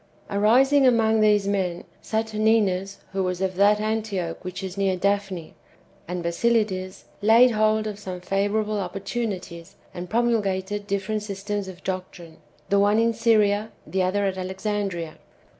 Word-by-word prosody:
Arising 260 +7 +4
among 225 -2 +3
these 210 -2 +3
men, 185 -3 -1 0.2
Saturninus 215 -3 0
(who 195 0 -1
was 180 -1 -2
of 190 -1 -1
that 205 +2 +4
Antioch 210 -6 -2
wdiich 185 +1 -6
is 190 -1 -5
near 195 -2 0
Daphne) 195 -3 -1 0.5
and 175 0 -4
Basilides 190 0 0 0.2
laid 230 +4 +6
hold 215 0 +2
of 210 -1 -5
some 185 -3 -6
favourable 205 +3 -1
opportunities, 195 -2 -5 0.2
and 175 0 -7
promulgated 205 -3 0
different 200 +2 -2
systems 205 0 -4
of 185 -1 -10
doctrine 180 -3 -6 0.2
— 150 0 -34
the 200 - +4
one 205 +1 +3
in 230 0 +3
Syria, 215 -2 +2
the 190 - -1
other 195 +2 +1
at 190 -1 -2
Alex 190 +1 -6
andria. 195 -6 -2
200 Hz, 145 wpm, -24 LUFS, 185-215 Hz, 0.5 s, laid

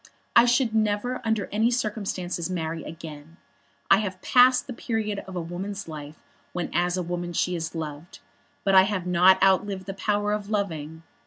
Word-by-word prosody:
I 235 - +8
should 245 -1 +2
never 220 +3 0
under 220 -3 0
any 220 +3 +2
circumstances 200 -7 -2
marry 160 -3 -3
again. 155 0 -10 0.5
I 195 - +7
have 190 -3 -4
passed 250 0 +5
the 255 - -6
period 220 -3 -2
of 190 - -8
a 175 - -2
woman's 190 +4 -5
life 150 -1 -9 0.3
when 175 -1 -3
as 175 +1 +1
a 180 - -1
woman 175 0 -4
she 180 +2 0
is 165 0 -4
loved; 155 +1 -6 0.5
but 195 - +2
I 190 - +9
have 195 -3 -2
not 180 +1 +5
outlived 190 0 +2
the 195 - -5
power 205 +1 0
of 210 -1 -4
loving. 160 -6 -3
190 Hz, 175 wpm, -25 LUFS, 170-210 Hz, 0.5 s, I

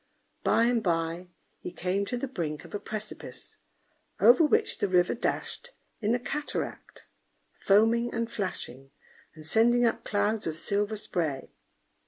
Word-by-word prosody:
By 230 - +4
and 235 -1 +2
by 170 -1 -1 0.3
he - - -6
came 185 +3 -1
to 245 - -2
the 275 - -3
brink 165 - -4
of - - -13
a 205 - -2
precipice, 215 0 -8 0.6
over 485 -9 +7
which 435 +8 +2
the - - +1
river 180 -1 +3
dashed 485 - -3 0.3
in 220 +2 +2
a - - -1
cataract, 295 +4 -5 0.5
foaming 225 +4 +3
and 230 0 -2
flashing, 135 - -5 0.5
and 155 -1 -10
sending 240 +7 +4
up 230 - 0
clouds 205 0 0
of 160 -1 -3
silver 205 +4 0
spray. 160 -9 -3
210 Hz, 145 wpm, -28 LUFS, 175-235 Hz, 0.6 s, over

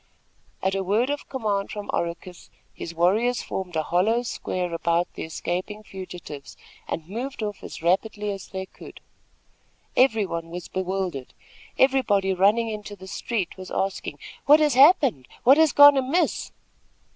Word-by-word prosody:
At 190 - +1
a 195 0 -1
word 220 +8 +1
of 290 - -5
command 210 -7 -1
from 210 -1 -6
Oracus 170 +1 -4 0.2
his 170 - -8
warriors 215 +9 +2
formed 180 -3 -5
a 155 - +1
hollow 215 +9 +1
square 180 -7 -3
about 170 +1 +1
the - - -8
escaping 180 +6 -4
fugitives, 180 -8 -9 0.3
and 160 -1 -4
moved 240 +5 -5
off 210 -1 -5
as - - -9
rapidly 205 +4 0
as 195 -1 -7
they 190 0 -5
could. - - -13 1.0
Everybody 210 -10 +2
was 175 +1 -8
bewildered. 185 -7 -3 0.4
Everybody 220 -8 +3
running 205 +5 +3
into 210 -1 -6
the 190 - -12
street 195 -1 -3
was 185 0 -9
asking: 195 0 -3 0.3
"What 300 +2 +8
has 300 -2 +3
happened? 265 - +5 0.2
What 265 +4 +7
has 320 -1 +5
gone 285 -1 +8
amiss?" 270 +7 0
195 Hz, 145 wpm, -24 LUFS, 180-240 Hz, 1.0 s, What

